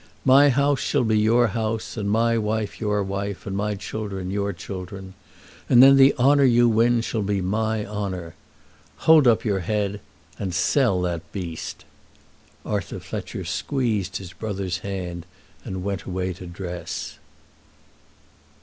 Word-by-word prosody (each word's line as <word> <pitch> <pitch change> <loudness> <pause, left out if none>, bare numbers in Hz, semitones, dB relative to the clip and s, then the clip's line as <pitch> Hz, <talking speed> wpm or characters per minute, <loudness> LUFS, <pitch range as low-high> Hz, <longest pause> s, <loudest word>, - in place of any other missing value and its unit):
My 135 +2 +7
house 140 +1 +2
shall 140 -1 +1
be 110 -2 +2
your 115 +2 +3
house, 110 +1 -3
and 105 -3 -2
my 115 +2 +2
wife 110 -1 -2
your 105 -2 0
wife, 100 0 -4
and 95 - -4
my 105 +1 -1
children 95 -2 -5
your 100 0 -1
children. 95 +1 -8 0.6
And 125 0 +8
then 135 +1 +8
the 135 0 +6
honour 140 +3 +4
you 120 -2 +5
win 115 +1 +3
shall 115 -1 -2
be 100 0 0
my 110 +3 -1
honour. 95 -5 -5 0.7
Hold 155 -4 +7
up 115 -1 +3
your 100 -3 +1
head, 105 +2 -2 0.4
and 95 -3 -3
sell 95 +1 +2
that 85 -2 -4
beast." 85 -5 -6 0.8
Arthur 100 -4 -3
Fletcher - - -6
squeezed 110 -9 -1
his 90 -2 -9
brother's 95 -5 -4
hand 90 -2 -5 0.4
and 95 -1 -5
went 100 -1 -2
away 95 0 -3
to 90 0 -10
dress. 90 0 -6
105 Hz, 145 wpm, -23 LUFS, 95-115 Hz, 0.8 s, And